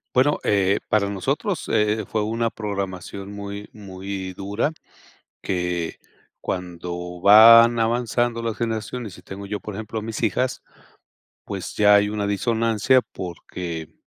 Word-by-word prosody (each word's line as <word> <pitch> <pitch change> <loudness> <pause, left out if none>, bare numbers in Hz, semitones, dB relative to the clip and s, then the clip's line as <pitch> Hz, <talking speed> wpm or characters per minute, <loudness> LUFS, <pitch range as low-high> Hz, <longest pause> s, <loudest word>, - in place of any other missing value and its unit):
Bueno, 140 +4 +3
eh, 100 0 +2
para 100 -2 +2
nosotros, 100 -2 -2
eh, 105 0 +2
fue 110 -1 -1
una 115 +2 -1
programación 100 -2 -5
muy 100 0 -7
muy 95 -2 -6
dura. 100 +9 -1 0.7
Que 90 -3 -2 0.4
cuando 90 -1 -5
van 115 +4 +8
avanzando 120 +1 0
las 115 -2 -2
generaciones 115 -1 -4
y - - -14
tengo 95 +2 -8
yo, 105 0 -3
por 105 - -7
ejemplo, 110 +1 -5
a - - -7
mis 110 +1 -5
hijas, 125 +5 0 0.8
pues, 95 -3 -5
ya 105 -1 +6
hay 105 0 +4
una 105 -1 -2
disonancia, 115 +4 +2
porque, 85 -2 -6
105 Hz, 130 wpm, -23 LUFS, 95-115 Hz, 0.8 s, van